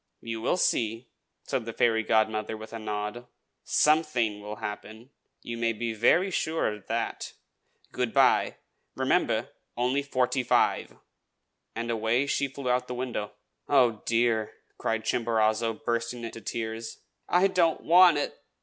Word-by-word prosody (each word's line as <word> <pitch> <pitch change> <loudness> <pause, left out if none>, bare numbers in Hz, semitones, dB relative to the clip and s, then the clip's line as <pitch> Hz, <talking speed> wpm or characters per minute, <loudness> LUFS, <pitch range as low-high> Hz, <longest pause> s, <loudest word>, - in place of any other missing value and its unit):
"You 115 -1 -4
will 150 - +1
see!" 115 -6 0 0.3
said - - -2
the 115 - -5
fairy 110 -1 +2
godmother, 110 0 0
with 110 +1 -10
a 115 - -5
nod. 105 +3 -4 0.4
"Something 150 -9 +2
will 105 +1 -6
happen, 110 +4 -8 0.3
you 115 - -5
may 115 0 +1
be 115 +1 -3
very 175 - +3
sure 160 -10 0
of 105 -2 -12
that. - - -3 0.6
Good - - -1
by. - - +3 0.4
Remember, - - +1 0.3
only 125 +3 +1
forty 130 -2 0
five!" 125 - +1 0.8
And 115 +1 -3
away 115 +4 +1
she 140 0 0
flew 135 0 -7
out 125 0 +3
of 125 - -22
the 125 - -5
window. 120 -5 -4 0.4
"Oh, 125 -6 +3
dear!" 115 -2 +1 0.3
cried 115 0 -1
Chimborazo, 115 -1 +1
bursting 115 +1 -2
into 115 0 -7
tears. 110 +1 -5 0.3
"I 180 +2 +4
don't 180 -4 +2
want 175 -1 +7
it! 145 - -3
115 Hz, 145 wpm, -27 LUFS, 110-130 Hz, 0.8 s, want